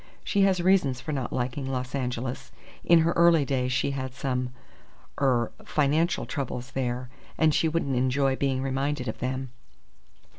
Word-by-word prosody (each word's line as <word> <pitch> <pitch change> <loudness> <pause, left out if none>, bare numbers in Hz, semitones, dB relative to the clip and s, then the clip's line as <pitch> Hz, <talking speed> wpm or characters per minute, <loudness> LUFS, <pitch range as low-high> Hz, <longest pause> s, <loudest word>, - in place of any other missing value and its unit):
She 200 - +1
has 195 -2 +4
reasons 175 -9 +3
for 145 +4 -5
not 135 -4 -3
liking 130 +2 -2
Los 130 -1 -3
Angeles. 125 -2 -3 0.3
In 170 -1 +6
her 165 +1 +2
early 170 -3 +5
days 130 -2 0
she 130 - +1
had 130 -2 -4
some 125 -1 -2 0.7
er 125 -4 +2
financial 155 +4 +1
troubles 125 -3 -4
there, 125 -1 -2 0.3
and 155 -1 +4
she 165 - +2
wouldn't 155 -4 0
enjoy 130 +2 +2
being 135 -1 0
reminded 135 0 -1
of - - -4
them." 130 +1 -3
135 Hz, 155 wpm, -27 LUFS, 125-150 Hz, 0.7 s, In